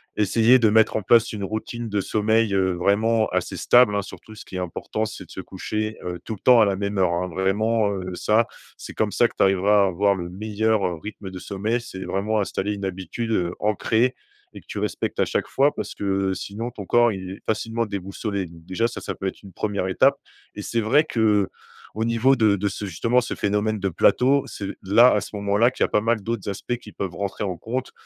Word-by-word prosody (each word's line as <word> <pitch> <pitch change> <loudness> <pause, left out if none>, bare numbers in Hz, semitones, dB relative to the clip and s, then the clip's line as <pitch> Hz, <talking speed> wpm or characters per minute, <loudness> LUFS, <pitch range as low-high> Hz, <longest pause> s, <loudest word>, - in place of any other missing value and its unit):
essayer 115 +4 +4
de 115 -2 +4
mettre 110 +1 +4
en 110 - 0
place 115 +3 +4
une 105 -2 -5
routine 110 +3 -4
de 105 -1 0
sommeil, 110 +2 +1
heu, 95 -1 +2
vraiment 110 +5 +2
assez - - -2
stable, 120 -4 +5
hein, 100 - +1
surtout 110 +2 -12
ce 110 - -11
qui - - -10
est - - -2
important, 90 +4 -3
c'est 110 - -8
de - - -18
se - - -6
coucher, 110 0 -4
heu, 90 0 -4
tout 110 - -5
le - - -17
temps 125 +1 +6
à - - +6
la 100 -1 +1
même 100 +1 -3
heure 90 -2 +3
hein, 90 +1 -1
vraiment 105 +4 +1
heu, 95 -2 -4
ça 110 +5 +2 0.3
c'est - - -9
comme - - 0
ça - - +3
que - - -16
tu - - +4
arriveras 100 +2 +4
à - - +3
avoir 100 +2 +2
le 85 -2 -5
meilleur, 110 +2 0
heu, 90 -2 -4
rythme 100 -2 -7
de 95 - -7
sommeil. 105 +6 -2
C'est 95 -5 -8
vraiment 105 +3 -1
installer 100 0 -2
une 100 -1 -5
habitude, 95 +5 -4
heu, 90 -5 0
ancrée 110 +4 +1 0.4
et - - -10
que - - -32
tu - - -4
respectes - - -3
à - - +4
chaque - - -1
fois 140 +2 +2
parce - - -5
que, - - -7 0.3
heu, - - 0
sinon 110 +6 -5
ton 105 -4 -8
corps, 120 +3 +4
il 95 -2 -6
est 95 - -9
facilement 115 +1 -1
déboussolé. 100 0 -4
Donc 85 -1 -14
déjà 95 +6 0
ça, 120 - -7
ça 95 - -5
peut 95 - -4
être - - -6
une 100 - -12
1re 100 -1 -2
étape 135 +9 +3 0.4
et 105 - -6
c'est 115 +3 -2
vrai 120 +8 +4
qu'au 110 -3 -1
niveau 115 +4 +3
de 110 -3 +4
de 100 +1 -1
ce 100 +2 -5
justement, 115 +7 +1
ce 120 - -4
phénomène 105 +1 0
de 100 0 -1
plateau, 130 - +3
c'est 100 - -6 0.2
là, 115 +6 +6
à 105 - +2
ce 105 - -8
moment-là, 100 +4 +2
qu'il - - -1
y - - +5
a - - -2
pas 105 - +2
mal 115 0 +1
d'autres 110 -1 -3
aspects 100 +5 -3
qui 110 -3 -13
peuvent 95 -4 -5
rentrer 100 +1 -3
en 95 -4 -3
compte, 125 +8 -4
105 Hz, 240 wpm, -23 LUFS, 95-115 Hz, 0.4 s, temps